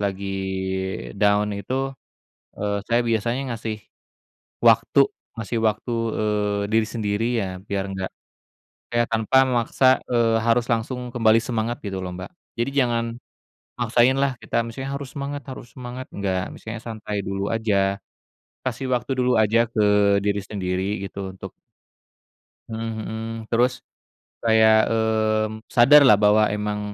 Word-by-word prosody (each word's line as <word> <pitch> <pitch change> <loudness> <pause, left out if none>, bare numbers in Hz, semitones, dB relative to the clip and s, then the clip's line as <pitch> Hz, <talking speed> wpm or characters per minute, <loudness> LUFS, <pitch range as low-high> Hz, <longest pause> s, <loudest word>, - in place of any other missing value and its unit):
lagi 100 -1 -2 0.9
down 105 0 +3
itu, 130 +7 -2 0.6
eee, 100 0 -2
saya 120 +1 +2
biasanya 115 +2 0 0.2
ngasih 110 -1 -4 0.9
waktu - - +3 0.3
ngasih 115 +1 -3
waktu, 110 +3 0 0.3
eee, 105 -1 0
diri 110 0 +3
sendiri 105 -1 -1 0.2
ya, 100 - -1 0.2
biar 100 -1 -3
nggak 95 -1 -4 0.8
kayak 120 0 +3
tanpa 115 +4 +3
memaksa, 130 +1 +3
eee, 115 -2 +2
harus 115 +2 +1
langsung 125 +2 -2
kembali 115 -2 +3
semangat, 115 0 -2
gitu 95 -3 -4
lo, 90 -1 -5
Mbak. 90 - -7 0.2
Jadi 120 +3 -1
jangan 120 -3 +2 0.7
maksain 120 +2 +3
lah, 135 -2 0
kita 115 - 0
misalnya, 130 +4 -6
"Harus 140 -1 -5
semangat, 140 +1 -4
harus 120 -3 -10
semangat!" 125 0 -7
Nggak, 95 -2 -2
misalnya 110 0 -7
santai 105 -3 -4
dulu 100 +1 -2
aja. 100 -3 +1 0.7
Kasih 130 +1 -3
waktu 125 +1 -1
dulu 125 -2 +2
aja 110 +2 +3
ke 110 -2 0 0.4
diri 100 0 +1
sendiri, 95 0 -3
gitu, 95 0 -6
untuk - - -8 1.2
Mhm 115 0 -4
mhm. 110 +1 -5 0.2
Terus 125 +2 +1 0.6
kayak, 110 -1 +5
mmm, 110 -1 0
sadarlah 130 -1 +7
bahwa 105 +1 +4
emang 105 0 -2
110 Hz, 130 wpm, -23 LUFS, 105-120 Hz, 1.2 s, sadarlah